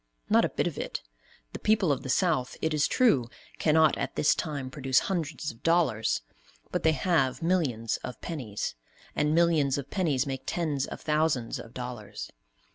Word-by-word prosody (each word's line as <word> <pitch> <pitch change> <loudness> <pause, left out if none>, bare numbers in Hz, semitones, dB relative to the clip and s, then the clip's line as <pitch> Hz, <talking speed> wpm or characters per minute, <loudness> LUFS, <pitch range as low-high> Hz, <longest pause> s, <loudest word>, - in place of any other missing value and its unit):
Not - - +6
a - - +1
bit - - -1
of - - -3
it. - - -4 0.5
The - - -5
people 210 -6 +3
of 135 - 0
the 130 - -7
South, 155 -5 +1
it 160 0 0
is 150 -1 +3
true, 145 - +3 0.3
cannot 155 0 +4
at - - -3
this 150 - +4
time 140 -4 -4
produce 130 -1 0
hundreds 160 -5 0
of 115 - -19
dollars, 165 - +2 0.5
but - - -1
they 160 - +4
have 155 -6 +1
millions 135 -11 +1
of 125 - -8
pennies; 120 - -4 0.4
and 150 +1 +2
millions 160 -5 +3
of 140 -1 -6
pennies 155 -8 +1
make 135 -2 -4
tens 150 -6 -1
of - - -8
thousands 150 -6 0
of 115 - -11
dollars. 125 -4 -6
150 Hz, 175 wpm, -28 LUFS, 130-165 Hz, 0.5 s, Not